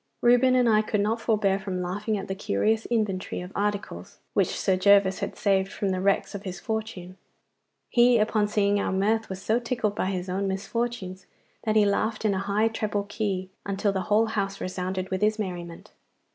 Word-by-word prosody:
Reuben 245 Hz, +2 st, +5 dB
and 250 Hz, -1 st, +4 dB
I 215 Hz, -1 st, +5 dB
could 215 Hz, -1 st, -1 dB
not 220 Hz, +3 st, 0 dB
forbear 205 Hz, -4 st, +1 dB
from 190 Hz, -2 st, -4 dB
laughing 205 Hz, +4 st, -2 dB
at 195 Hz, -, -6 dB
the 190 Hz, -, -2 dB
curious 215 Hz, -, 0 dB
inventory 210 Hz, -6 st, -1 dB
of 180 Hz, +1 st, -7 dB
articles 200 Hz, -, -3 dB, 0.2 s
which -, -, +1 dB
Sir 190 Hz, -, +2 dB
Gervas 195 Hz, 0 st, +4 dB
had -, -, -4 dB
saved 195 Hz, -1 st, +1 dB
from 200 Hz, -, -2 dB
the 185 Hz, -1 st, -1 dB
wreck 195 Hz, +1 st, +1 dB
of 200 Hz, -, -5 dB
his 185 Hz, -3 st, -6 dB
fortunes. 215 Hz, -5 st, -5 dB, 0.7 s
He 240 Hz, 0 st, +5 dB
upon 215 Hz, -1 st, +2 dB
seeing 205 Hz, -1 st, +2 dB
our -, -, -1 dB
mirth 215 Hz, +4 st, +1 dB
was 190 Hz, 0 st, -6 dB
so 225 Hz, +2 st, +2 dB
tickled 230 Hz, -4 st, -2 dB
at -, -, +1 dB
his 185 Hz, -1 st, -3 dB
own 195 Hz, +2 st, -1 dB
misfortunes, 195 Hz, -1 st, -3 dB, 0.4 s
that 215 Hz, -1 st, +1 dB
he 215 Hz, -1 st, +5 dB
laughed 215 Hz, +2 st, 0 dB
in 210 Hz, -, +3 dB
a 190 Hz, -, -1 dB
high 200 Hz, +3 st, +1 dB
treble 210 Hz, -2 st, -2 dB
key 195 Hz, -3 st, -2 dB
until 200 Hz, +1 st, 0 dB
the 190 Hz, -1 st, -2 dB
whole 215 Hz, +2 st, +4 dB
house 200 Hz, -3 st, -2 dB
resounded 185 Hz, +1 st, -3 dB
with 190 Hz, -, -1 dB
his 215 Hz, +1 st, +2 dB
merriment. 175 Hz, -5 st, -6 dB
200 Hz, 195 wpm, -26 LUFS, 190-220 Hz, 0.7 s, Reuben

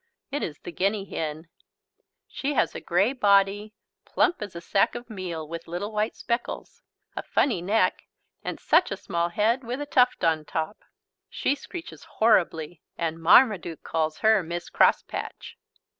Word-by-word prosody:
It 290 Hz, -, -2 dB
is 150 Hz, -3 st, -4 dB
the -, -, -9 dB
guinea 195 Hz, +3 st, 0 dB
hen. 160 Hz, -2 st, -5 dB, 0.8 s
She 285 Hz, +1 st, -3 dB
has -, -, +2 dB
a -, -, -6 dB
grey 195 Hz, +8 st, +2 dB
body, 205 Hz, -2 st, +2 dB, 0.3 s
plump 350 Hz, -, +1 dB
as 205 Hz, -4 st, -6 dB
a -, -, -4 dB
sack 195 Hz, +6 st, +1 dB
of 240 Hz, -1 st, -8 dB
meal, 175 Hz, -6 st, -5 dB
with 165 Hz, +1 st, -7 dB
little 180 Hz, +6 st, -4 dB
white 215 Hz, +1 st, -1 dB
speckles, 235 Hz, +1 st, -4 dB, 0.3 s
a -, -, -3 dB
funny 225 Hz, -11 st, +1 dB
neck 205 Hz, +5 st, +1 dB, 0.4 s
and -, -, -4 dB
such -, -, +3 dB
a 195 Hz, -, -3 dB
small 170 Hz, -3 st, -1 dB
head 225 Hz, +8 st, +1 dB
with 245 Hz, +3 st, -4 dB
a 290 Hz, -, -3 dB
tuft 255 Hz, -3 st, +2 dB
on 160 Hz, -2 st, +2 dB
top. 160 Hz, +6 st, -4 dB, 0.5 s
She 270 Hz, -, 0 dB
screeches 330 Hz, +4 st, -9 dB
horribly 175 Hz, -7 st, +2 dB, 0.2 s
and 165 Hz, -1 st, -3 dB
Marmaduke 180 Hz, -2 st, +4 dB
calls 155 Hz, -1 st, -1 dB
her 220 Hz, -2 st, +6 dB
"Miss 170 Hz, 0 st, -6 dB
Crosspatch." -, -, 0 dB
195 Hz, 160 wpm, -26 LUFS, 170-225 Hz, 0.8 s, her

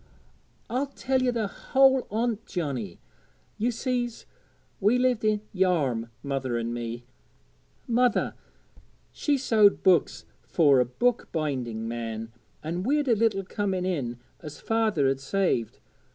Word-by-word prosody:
'I'll 260 Hz, +4 st, -1 dB
tell 265 Hz, -1 st, -1 dB
ye 255 Hz, -, +2 dB
the 235 Hz, -3 st, 0 dB
whole 265 Hz, +5 st, +3 dB
on't, 225 Hz, +1 st, -1 dB
Johnnie. 130 Hz, -, -4 dB, 0.6 s
Ye 230 Hz, +4 st, +1 dB
sees, 240 Hz, -1 st, -2 dB, 0.5 s
we 210 Hz, +5 st, +3 dB
lived 250 Hz, -3 st, +1 dB
i' 215 Hz, -1 st, +2 dB
Yarm 150 Hz, -, +1 dB
mother 135 Hz, -4 st, -2 dB
and 115 Hz, 0 st, -2 dB
me. 120 Hz, 0 st, -5 dB, 0.8 s
Mother, 245 Hz, -1 st, +2 dB, 0.8 s
she 290 Hz, -2 st, 0 dB
sewed 215 Hz, -6 st, +4 dB
books 180 Hz, -5 st, +3 dB, 0.2 s
fur 145 Hz, -6 st, +4 dB
a 125 Hz, -, +3 dB
book 240 Hz, -, 0 dB
binding 125 Hz, -8 st, -2 dB
man; 115 Hz, -1 st, -5 dB, 0.3 s
an' 170 Hz, +3 st, -3 dB
we'd 285 Hz, +7 st, +1 dB
a 235 Hz, -, +4 dB
little 210 Hz, -3 st, +1 dB
coming 190 Hz, -2 st, -2 dB
in 135 Hz, -10 st, -2 dB, 0.2 s
as 150 Hz, -2 st, -9 dB
father'd 205 Hz, -13 st, +1 dB
saved. 140 Hz, -, 0 dB
190 Hz, 125 wpm, -27 LUFS, -, 0.8 s, sewed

